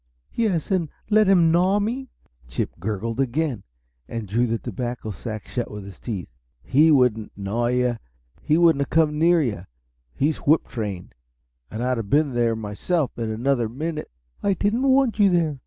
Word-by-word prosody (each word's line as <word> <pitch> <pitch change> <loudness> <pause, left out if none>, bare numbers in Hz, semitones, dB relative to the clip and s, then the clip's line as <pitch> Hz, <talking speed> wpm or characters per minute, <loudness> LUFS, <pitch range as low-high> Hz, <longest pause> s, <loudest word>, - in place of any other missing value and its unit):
"Yes 200 -8 0
and 175 -5 +1 0.2
let 215 -1 +5
him 175 -4 +5
gnaw 180 +4 +3
me!" 240 +5 -3 0.4
Chip - - -3
gurgled 110 +5 -3
again, 135 -2 0 0.5
and 115 -3 -5
drew 120 +5 +1
the 115 0 0
tobacco 120 0 -5
sack 110 +3 -7
shut 120 -2 -3
with 105 -1 -7
his 100 -2 -11
teeth. 100 - -5 0.3
"He 150 +5 +4
wouldn't 125 -7 +3
'gnaw' 105 +4 -1
you 125 -1 +1 0.4
he 155 - +2
wouldn't 165 -4 +4
have 140 - -2
come 150 -2 +2
near 170 0 +4
you. 100 -8 -3 0.5
He's 150 - +1
whip 155 +3 +2
trained. 100 -6 -5 0.6
And 110 +2 -4
I'd 125 0 0
have 110 -3 -4
been 145 -2 +2
there 120 -1 +1
myself 110 - -2
in 115 -1 -2
another 120 +1 0
minute." 155 +6 -4 0.3
"I 200 -1 +1
didn't 210 +6 0
want 265 -4 +3
you 200 -1 +6
there! 165 -6 +1
130 Hz, 170 wpm, -23 LUFS, 115-165 Hz, 0.6 s, you